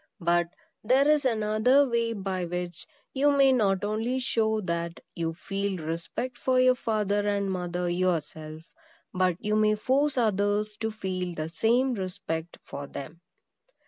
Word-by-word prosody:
But 175 0 +2 0.4
there 260 +5 +4
is 300 -2 +3
another 225 +4 +3
way 235 -1 0
by 190 -3 -3
which 175 -1 -5 0.3
you 280 +2 +3
may 275 -1 +5
not 200 -6 +2
only 220 +5 -1
show 220 -4 +1
that 170 -2 -3 0.2
you 165 -1 -2
feel 195 +1 -3
respect 170 +10 -4
for 255 -1 +2
your 255 0 +6
father 210 -4 0
and 200 -1 0
mother 180 -1 -2
yourself, 160 -3 -2 0.5
but 185 -2 +2
you 210 0 -1
may 215 0 +3
force 270 +6 +1
others 210 -1 +1
to 220 0 -2
feel 185 -4 -4
the 155 0 -3
same 240 +9 +2
respect 175 -4 -4
for 140 0 -7
them. 155 +5 -8
205 Hz, 145 wpm, -27 LUFS, 175-235 Hz, 0.5 s, your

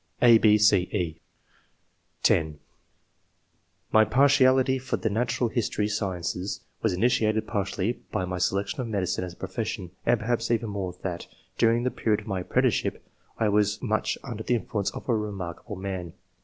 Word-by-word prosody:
(a, 115 -2 +7
6, 105 -1 +5
c, 105 - +5
e) 85 -5 -2 1.0
(10) 80 -2 +2 1.3
"My 110 - +6
partiality 130 +2 +4
for 130 0 -2
the 110 - -1
natural 120 +2 0
history 110 -3 -1
sciences 95 -2 -3 0.2
was 110 - +2
initiated 110 +2 +2
partly 100 +1 -2
by 95 - -1
my 90 0 -4
selection 100 - 0
of 125 - -4
medicine 100 -4 -1
as 90 -1 -6
a - - -19
profession, 95 -1 -4
and 120 - +3
perhaps 115 +1 -1
even 115 -1 0
more 95 -3 -4
that, 90 -2 -4 0.3
during 115 0 +3
the 125 - 0
period 105 -2 0
of - - -15
my 100 -4 -2
apprenticeship, 90 - 0 0.3
I 110 - +2
was 105 0 +2
much 110 -2 0
under 115 -5 -6
the 120 - +1
influence 105 -3 -2
of - - -9
a 120 - +2
remarkable 100 -1 -5
man 95 -3 -5
105 Hz, 160 wpm, -26 LUFS, 95-115 Hz, 1.3 s, a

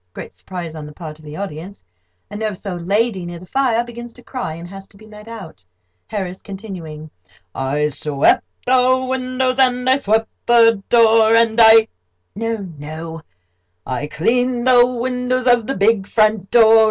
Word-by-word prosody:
Great - - -9
surprise 175 -4 -8
on 155 -2 -8
the - - -10
part 155 -1 -9
of 155 - -17
the 150 +1 -9
audience. 190 - -8 0.5
Nervous 210 -1 -5
old 175 -3 -5
lady 205 -1 0
near 175 0 -7
the 175 - -12
fire 240 +2 0
begins 240 0 -9
to 245 - -16
cry, 245 -12 -5
and 170 +1 -9
has 195 +1 -11
to 200 - -21
be 215 - -16
led 210 0 -14
out.] 220 - -10 0.4
HARRIS 190 -3 -5
(continuing): 175 -7 -9 0.4
"'I 145 +3 -1
swept 145 0 +1 0.2
the 255 0 +3
windows 255 0 -1
and 250 -1 +2
I 260 +1 +4
swept 220 -3 0 0.2
the 230 -3 +5
door, 225 -1 +5
And 230 0 +3
I—' 220 0 +7 0.5
No—no, 165 -7 -6 0.6
I 130 +3 -4
cleaned 245 +9 0
the 245 -1 +6
windows 250 +1 -2
of 245 -3 +3
the 270 - -3
big 200 0 +2
front 215 -3 +1
door. 225 -1 +6
220 Hz, 165 wpm, -18 LUFS, 175-240 Hz, 0.6 s, I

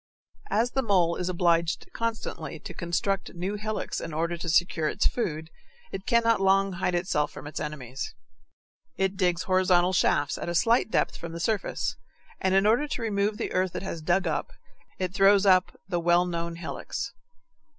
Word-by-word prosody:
As 235 +3 +1
the 265 - +1
mole 180 -7 +2
is 180 - -2
obliged 170 -2 +1
constantly 230 -1 -3
to - - -8
construct 190 +3 -2
new 180 +4 -3
hillocks 215 +1 -3
in 160 - -6
order 170 +2 0
to 170 0 -5
secure 160 -1 +2
its - - 0
food, 160 -8 -1 0.4
it 190 - -6
cannot 230 -2 +3
long 195 0 +3
hide 180 0 -1
itself 175 -4 0
from - - -10
its 145 - -5
enemies. 135 -4 -5 0.8
It 190 0 0
digs 180 -2 +1
horizontal 185 -1 +3
shafts 145 -5 +2
at - - -4
a 175 - -2
slight 230 +7 +3
depth - - 0
from 170 -1 -7
the 170 - -5
surface, 210 +3 -1 0.4
and 190 0 +1
in 195 +1 +4
order 235 +8 +3
to 250 - -4
remove 210 -1 0
the - - -3
earth 185 -1 0
it - - -3
has 170 -4 -5
dug 175 +4 +1
up, - - -2 0.5
it 185 -1 -2
throws 195 +1 +5
up 185 -1 +4
the 175 -2 -1
well 175 +1 +3
known 170 -1 -3
hillocks. 170 - -5
185 Hz, 180 wpm, -27 LUFS, 170-200 Hz, 0.8 s, throws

